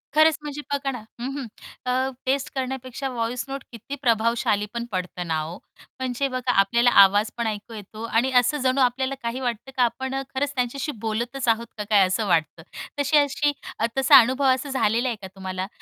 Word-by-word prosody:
खरंच 315 0 +5
म्हणजे 295 0 -6
बघा 275 -1 -1
ना 245 - -6 0.2
हं, 250 +3 -3
हं. 260 -4 -5 0.4
अ, 260 +1 +1 0.2
टेस्ट 270 +1 0
करण्यापेक्षा 265 0 -3
व्हॉइस 240 +1 -2
नोट 270 0 -5
किती 240 +5 -7
प्रभावशाली 230 -3 +2
पण 235 0 -3
पडत 185 -1 -4
ना 160 -1 0
हो! 165 +4 -5 0.4
म्हणजे 260 +1 -1
बघा 255 -1 -1
आपल्याला 235 +5 +4
आवाज 205 +3 +3
पण 235 -1 -1
ऐकू 215 +1 -5
येतो 215 +1 -9
आणि 235 +3 +1
असं 260 +5 +1
जणू 260 +1 +2
आपल्याला 260 +2 +1
काही 235 +3 -2
वाटतं 245 +1 -3
का 250 - +5
आपण 265 +3 -1
अ, 270 - -1
खरंच 285 +1 0
त्यांच्याशी 255 +4 -1
बोलतच 235 +4 -2
आहोत 230 +1 +2
का 210 - -3
काय 200 -3 +6
असं 200 +3 -1
वाटतं, 160 -1 0 0.4
तशी 285 +2 +3
अशी 290 +1 +2 0.3
अ, 225 - +2
तसा 270 +1 +8
अनुभव 260 +4 +2
असा 260 +2 -4
झालेला 240 -1 +1
आहे 235 - -2
का 190 - -7
तुम्हाला? 190 0 -4
245 Hz, 195 wpm, -24 LUFS, 220-265 Hz, 0.4 s, तसा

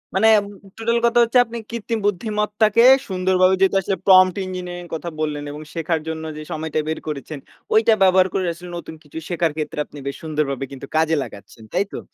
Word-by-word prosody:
মানে 205 +4 +4 0.2
ম - - -9 0.3
টোটাল 230 +1 0
কথা 235 0 +3
হচ্ছে 235 +2 +2
আপনি 235 +1 -7
কৃত্রিম 230 -1 -3
বুদ্ধিমত্তাকে 210 +2 +1 0.3
সুন্দরভাবে 185 0 +3
যেহেতু 195 0 +3
আসলে 195 +1 -2
প্রমট 185 -1 +6
ইঞ্জিনিয়ারিং 180 -1 -6
কথা 170 +2 -5
বললেন 150 -1 -2
এবং 150 +1 -8
শেখার 165 -1 -1
জন্য 160 0 -4
যে - - -6
সময়টা 155 0 -2
বের 160 - -2
করেছেন, 150 0 -5 0.3
ওইটা 220 +1 +5
ব্যবহার 185 0 +5
করে 190 -1 0
আসলে 175 +1 -11
নতুন 165 -1 -8
কিছু 150 +1 -12
শেখার 170 -2 0
ক্ষেত্রে 150 -1 -4
আপনি 145 - -14
বেশ 140 - -3
সুন্দরভাবে 150 -4 -2
কিন্তু 135 0 -9
কাজে 160 0 +3
লাগাচ্ছেন। 100 +3 -12
তাই 190 +3 +1
তো? - - -4
180 Hz, 190 wpm, -21 LUFS, 155-205 Hz, 0.3 s, প্রমট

